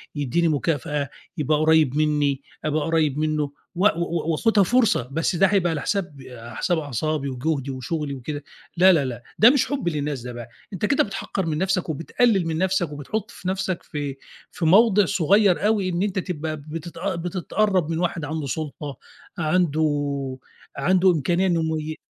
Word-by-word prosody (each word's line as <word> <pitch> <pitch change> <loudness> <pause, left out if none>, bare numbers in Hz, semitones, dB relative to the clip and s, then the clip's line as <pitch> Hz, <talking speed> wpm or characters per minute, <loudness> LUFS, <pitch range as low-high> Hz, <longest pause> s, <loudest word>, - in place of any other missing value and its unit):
يدّيني 145 +4 +1
مكافأة 155 0 -1
آآ، 140 - -4 0.3
يبقى 150 0 +1
قريّب 155 -3 +3
مني، 150 -3 +1 0.2
أبقى 155 0 0
قريّب 155 -4 +1
منه 155 0 0 0.3
و 185 +4 +1
و 170 -2 -1
وأخُدها 210 +5 +3
فرصة، 225 - +2
بس 165 +4 0
ده 195 +3 +5
هيبقى 190 -3 +2
على 155 -3 -2
حساب 190 -7 -2
على 120 -2 -10
حساب 175 - 0
أعصابي 145 +1 -2
وجهدي 135 +1 -2
وشغلي 140 +3 -3
وكده، 145 +3 -6 0.3
لا، 185 +2 +7
لا، 150 -5 +2
لا 120 -2 -5 0.2
ده 225 - +9
مش 260 -1 +3
حب 280 -10 -3
للناس 145 -4 -3
ده 125 +1 -7
بقى، 120 -1 -8 0.2
أنت 190 +2 -1
كده 275 - +3
بتحقّر 195 -2 -4
من 155 -2 -1
نفسك 185 0 0
وبتقلِّل 190 - +1
من 160 -1 -1
نفسك 185 -3 0
وبتحط 150 +9 -4
في 180 - -9
نفسك 185 -1 -2
في 145 -3 -5 0.3
في 170 - -3
موضع 205 +3 +5
صغير 195 +3 +3
أوي، 205 -4 +1
إن 175 +1 -1
أنت 200 -2 -1
تبقى 160 -4 -4
بتت 155 +3 -8
بتتقرّب 185 0 0
من 165 0 -1
واحد 170 -3 -1
عنده 155 -1 -3
سُلطة 145 0 -5 0.4
عنده 145 -5 0 0.4
عنده 185 +5 +4
إمكانية 175 +4 +1
إنه 170 -2 +1 0.2
يم 155 +1 -5
160 Hz, 170 wpm, -23 LUFS, 145-185 Hz, 0.4 s, ده